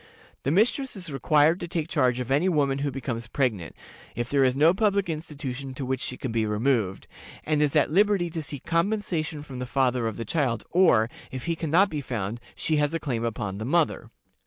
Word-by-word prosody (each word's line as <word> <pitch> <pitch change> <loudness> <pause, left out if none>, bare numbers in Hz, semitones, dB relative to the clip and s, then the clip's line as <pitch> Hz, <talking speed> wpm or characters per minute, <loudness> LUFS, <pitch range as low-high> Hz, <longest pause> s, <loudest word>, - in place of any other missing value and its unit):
The - - -1
mistress 230 - +2
is 180 -5 -7
required 150 +5 +3
to 175 - -5
take 165 -2 -2
charge 130 -6 +1
of 125 +1 -4
any 150 +7 +3
woman 140 -5 +1
who 145 0 0
becomes 120 -3 -4
pregnant, 115 - -1 0.4
if 120 +1 -3
there 140 -1 +4
is 130 0 +2
no 160 +4 +5
public 200 -2 +1
institution 140 -4 -6
to 135 -1 -4
which 130 0 -2
she 125 - -4
can 130 - -4
be 115 -1 +1
removed, 105 -3 0 0.4
and 150 -1 +1
is 150 -2 +1
at - - +3
liberty 195 -1 +3
to 165 -1 -3
seek 145 -3 -7
compensation 170 -4 -1
from 135 -4 -8
the 125 - -4
father 125 -3 +1
of 110 - -4
the 115 - -4
child, 125 -4 0
or, 165 -12 +5 0.2
if 130 -1 -6
he 170 -1 0
can 160 -1 -4
not 190 +6 +4
be 150 -2 -2
found, 115 -3 -4
she 155 - 0
has 150 +2 +1
a - - 0
claim 125 -7 -2
upon 105 -4 -3
the - - -4
mother. 160 +4 +1
140 Hz, 215 wpm, -26 LUFS, 125-165 Hz, 0.4 s, no